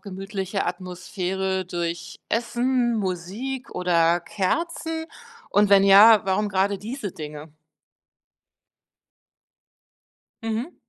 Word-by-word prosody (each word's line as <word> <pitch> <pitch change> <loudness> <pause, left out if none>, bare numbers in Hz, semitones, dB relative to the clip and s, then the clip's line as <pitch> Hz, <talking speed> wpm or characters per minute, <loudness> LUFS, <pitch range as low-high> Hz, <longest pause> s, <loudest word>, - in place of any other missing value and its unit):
gemütliche 195 0 -4
Atmosphäre 185 +1 -3
durch 170 -1 -4
Essen, 240 +1 0
Musik 205 +8 -4
oder 170 -1 +2
Kerzen 320 - -2 0.5
und 205 0 +4
wenn 195 -1 +7
ja, 205 +2 +8
warum 195 +2 0
gerade 195 +1 0
diese 225 -2 -6
Dinge? 150 0 -9 2.9
Mhm. 225 +8 -3
195 Hz, 85 wpm, -24 LUFS, 180-225 Hz, 2.9 s, ja